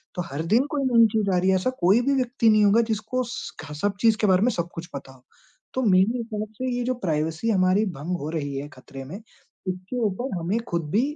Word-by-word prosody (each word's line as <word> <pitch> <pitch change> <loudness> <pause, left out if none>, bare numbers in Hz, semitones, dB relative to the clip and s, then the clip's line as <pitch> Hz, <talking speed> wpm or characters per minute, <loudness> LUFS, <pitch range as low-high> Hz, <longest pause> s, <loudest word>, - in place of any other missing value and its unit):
तो 180 - -2
हर 145 +3 -3
दिन 250 +5 +4
कोई 285 -2 -1
नई 235 -3 +6
चीज़ 215 -2 0
आ - - +3
रही 185 +2 +2
है। 190 - +4
ऐसा 185 +7 +1
कोई 190 +7 +4
भी 275 +3 +1
व्यक्ति 245 -3 +2
नहीं 215 -1 +5
होगा 215 +4 +5
जिसको 220 +4 -1
स 245 - -6
ख 150 -1 -8
सब 205 -1 +1
चीज़ 225 -2 +4
के 210 - +3
बारे 185 0 +4
में 245 - +4
सब 170 -3 -3
कुछ 165 +1 -6
पता 135 -1 -7
हो। 130 -1 -21 0.5
तो 260 - -1
मेरी 215 +4 +3
तरफ 210 0 -3
से 255 +4 -3
ये 245 - -1
जो 255 +1 0
प्राइवेसी 160 +5 -1
हमारी 190 +1 +3
भंग 175 +5 -3
हो 150 - -4
रही 145 -4 -3
है 145 +2 -5
खतरे 135 0 -11
में, 175 +9 -7 0.5
इसके 185 +6 -4
ऊपर 205 +1 -2
हमें 185 +7 -1
खुद 170 -3 -2
भी 220 - +3
200 Hz, 245 wpm, -24 LUFS, 170-230 Hz, 0.5 s, नई